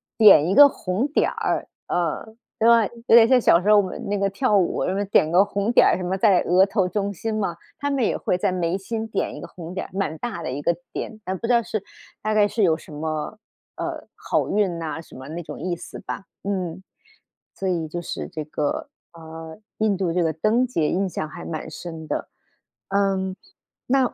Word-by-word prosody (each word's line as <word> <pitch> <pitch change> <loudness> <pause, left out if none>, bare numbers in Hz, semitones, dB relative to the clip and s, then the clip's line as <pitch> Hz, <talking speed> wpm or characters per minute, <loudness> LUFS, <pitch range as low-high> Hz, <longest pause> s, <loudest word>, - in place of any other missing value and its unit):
点 200 -8 +7
一 185 - +1
个 285 +6 +9
红 195 +1 -2
点 295 - +1
儿， - - -2 0.2
呃， 175 +5 -2 0.2
对 225 - +4
吧， 230 -2 +6 0.2
有 - - +7
点 230 -1 +8
像 255 0 +5
小 170 - +5
时 205 - -3
候 210 - +8
我 205 - +7
们 185 - -6
那 205 0 -1
个 200 0 +1
跳 210 +2 +1
舞 185 -3 +2
什 185 - 0
么 200 - 0
点 160 -5 +3
个 185 +3 +6
红 205 +2 -1
点 - - +6
儿 - - +3
什 185 - -5
么 180 +1 -1
在 195 -3 +5
额 185 +3 +4
头 195 -2 +1
中 200 +1 -1
心 220 +4 -4
嘛， 200 -5 -1 0.2
他 285 - -1
们 275 -3 0
也 - - +1
会 180 - 0
在 195 +1 0
眉 180 0 -1
心 220 +3 -4
点 210 -3 -2
一 - - -8
个 - - -7
红 175 0 -9
点 190 - -4
儿， - - -24
蛮 190 -5 -1
大 210 -9 -4
的 130 - -3
一 140 +3 -4
个 170 - +1 0.2
点， 215 - -5
但 190 - -2
不 230 - -4
知 245 - +3
道 235 -1 +4
是 215 -2 -3 0.4
大 215 0 -1
概 210 -1 +5
是 220 +1 -2
有 165 -5 +4
什 155 - -13
么， 155 +6 -4 0.4
呃， - - -4
好 - - -1
运 195 -5 +1
呐 160 -1 -4
什 - - -16
么 130 +3 -9
那 170 +2 -5
种 165 - -8
意 180 -1 -2
思 - - -10
吧， 195 - -6 0.2
嗯。 185 -2 -3 0.7
所 195 - -3
以 170 -3 -1
就 175 +3 -4
是 - - -5
这 155 - -5
个， 150 -1 -2 0.3
呃， 160 -1 -10 0.2
印 215 -3 +2
度 180 -3 -1
这 175 0 +2
个 160 - +1
灯 215 - +2
节 165 -12 0
印 190 +1 0
象 155 -2 -4
还 - - -9
蛮 160 -1 -5
深 160 0 -8
的， - - -3 0.6
嗯， 195 -1 0 0.5
那 260 -1 +2
190 Hz, 245 characters per minute, -23 LUFS, 170-215 Hz, 0.7 s, 个